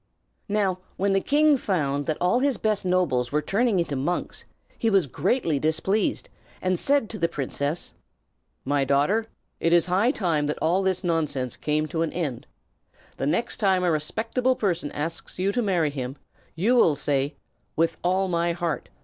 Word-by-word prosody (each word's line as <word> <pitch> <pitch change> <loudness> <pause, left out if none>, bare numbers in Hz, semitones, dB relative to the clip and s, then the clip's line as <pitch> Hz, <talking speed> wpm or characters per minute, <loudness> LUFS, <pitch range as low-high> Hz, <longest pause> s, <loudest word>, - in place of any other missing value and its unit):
Now, 200 -3 +1 0.2
when 195 +1 +1
the 195 - +2
king 295 +3 +4
found 145 - -1
that 155 - 0
all 180 +8 +2
his 275 -1 +1
best 215 -3 0
nobles 175 -10 +1
were 150 - +2
turning 215 +5 +1
into 170 -5 -1
monks, 145 +7 -3 0.3
he 225 - +2
was 195 -5 +3
greatly 155 - 0
displeased, 160 - 0 0.3
and 185 -1 0
said 280 -5 +2
to 215 - -5
the 170 -1 +1
princess: 145 +2 -3 0.7
"My 140 +1 +1
daughter, 145 +12 +2 0.3
it 165 - +1
is 170 -1 +5
high 190 +6 +2
time 170 - 0
that 150 - -2
all 175 +4 +2
this 190 -1 0
nonsense 150 -7 -1
came 155 +1 -1
to 160 +2 -2
an 165 - 0
end. 150 -9 -3 0.7
The 135 - -1
next 175 +10 0
time 190 -4 +2
a 175 - +3
respectable 225 - 0
person 175 -9 -1
asks 160 +3 -5
you 190 +2 +1
to 245 - 0
marry 175 -8 +1
him, 130 -2 -5 0.4
you 210 +10 +2
will 170 -11 +5
say, 140 +1 0 0.4
'With 165 0 +1
all 185 +2 +2
my 170 -1 0
heart!' 170 -2 -3
175 Hz, 175 wpm, -25 LUFS, 150-200 Hz, 0.7 s, is